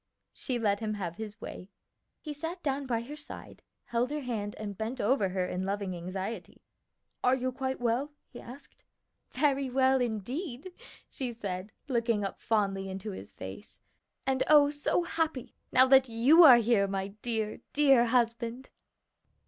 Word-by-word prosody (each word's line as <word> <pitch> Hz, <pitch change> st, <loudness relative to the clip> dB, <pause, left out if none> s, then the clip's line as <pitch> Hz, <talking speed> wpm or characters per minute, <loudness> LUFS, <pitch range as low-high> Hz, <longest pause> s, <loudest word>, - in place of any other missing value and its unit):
She 255 Hz, -3 st, -3 dB
let 205 Hz, -3 st, +1 dB
him 215 Hz, -1 st, -2 dB
have 175 Hz, -4 st, -5 dB
his 220 Hz, 0 st, -7 dB
way. 185 Hz, -, -8 dB, 0.5 s
He 300 Hz, -, -6 dB
sat 325 Hz, +5 st, -6 dB
down 275 Hz, -1 st, -1 dB
by 230 Hz, -2 st, 0 dB
her 275 Hz, +6 st, -8 dB
side, 295 Hz, -1 st, -11 dB, 0.2 s
held 240 Hz, +1 st, -1 dB
her 300 Hz, 0 st, -3 dB
hand, 215 Hz, -5 st, -4 dB
and 205 Hz, -2 st, -5 dB
bent 225 Hz, +6 st, -4 dB
over 210 Hz, -3 st, +2 dB
her 185 Hz, 0 st, -1 dB
in 180 Hz, +1 st, -3 dB
loving 195 Hz, -1 st, -2 dB
anxiety. 185 Hz, +5 st, -6 dB, 0.6 s
"Are 250 Hz, +1 st, +4 dB
you 255 Hz, 0 st, -2 dB
quite 265 Hz, 0 st, -3 dB
well?" 245 Hz, +5 st, 0 dB, 0.2 s
he 240 Hz, -, -11 dB
asked. 250 Hz, +4 st, -13 dB, 0.5 s
"Very 275 Hz, -1 st, +1 dB
well 260 Hz, 0 st, +3 dB
indeed," 250 Hz, -, -4 dB, 0.4 s
she 260 Hz, -4 st, -4 dB
said, 200 Hz, -3 st, -5 dB, 0.2 s
looking 230 Hz, -5 st, 0 dB
up 195 Hz, -, -5 dB
fondly 195 Hz, -3 st, 0 dB
into 190 Hz, +3 st, -5 dB
his 190 Hz, -, -9 dB
face, -, -, -10 dB, 0.5 s
"and, 265 Hz, -1 st, 0 dB
oh, 290 Hz, -1 st, +6 dB
so 295 Hz, +4 st, 0 dB
happy 320 Hz, -6 st, -2 dB, 0.2 s
now 255 Hz, -, +6 dB
that 265 Hz, -1 st, +6 dB
you 250 Hz, +9 st, +6 dB
are 255 Hz, -5 st, +10 dB
here, 225 Hz, -3 st, +3 dB
my 195 Hz, 0 st, -3 dB
dear, 220 Hz, -3 st, -2 dB
dear 275 Hz, -5 st, +5 dB
husband!" 235 Hz, +1 st, 0 dB
240 Hz, 160 wpm, -30 LUFS, 205-265 Hz, 0.6 s, are